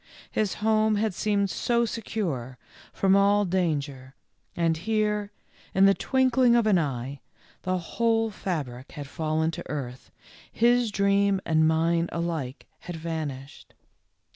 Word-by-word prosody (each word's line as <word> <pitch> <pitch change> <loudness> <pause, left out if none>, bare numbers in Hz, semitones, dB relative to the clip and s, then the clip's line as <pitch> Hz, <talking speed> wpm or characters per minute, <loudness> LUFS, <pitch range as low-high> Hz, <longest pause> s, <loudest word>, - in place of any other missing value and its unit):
His 210 -3 0
home 215 0 +2
had 210 -1 0
seemed 200 +1 0
so 235 -1 +1
secure 170 - -4 0.3
from 195 0 +2
all 200 +1 +4
danger, 145 -8 -2 0.4
and 165 -1 +1
here, 210 +2 -1 0.4
in 190 +1 +6
the 195 - +6
twinkling 255 0 +3
of 235 -2 +3
an 205 -5 +4
eye, 135 -2 -3 0.4
the 185 0 -1
whole 225 +5 0
fabric 140 -11 -5
had 145 -3 -6
fallen 160 +2 -1
to - - -8
earth, 130 -4 -6 0.4
his 240 0 +3
dream 200 -1 +2
and 160 -1 +3
mine 165 +1 +1
alike 165 -6 -3
had 175 - -7
vanished. 155 -4 -6
180 Hz, 130 wpm, -26 LUFS, 155-215 Hz, 0.4 s, in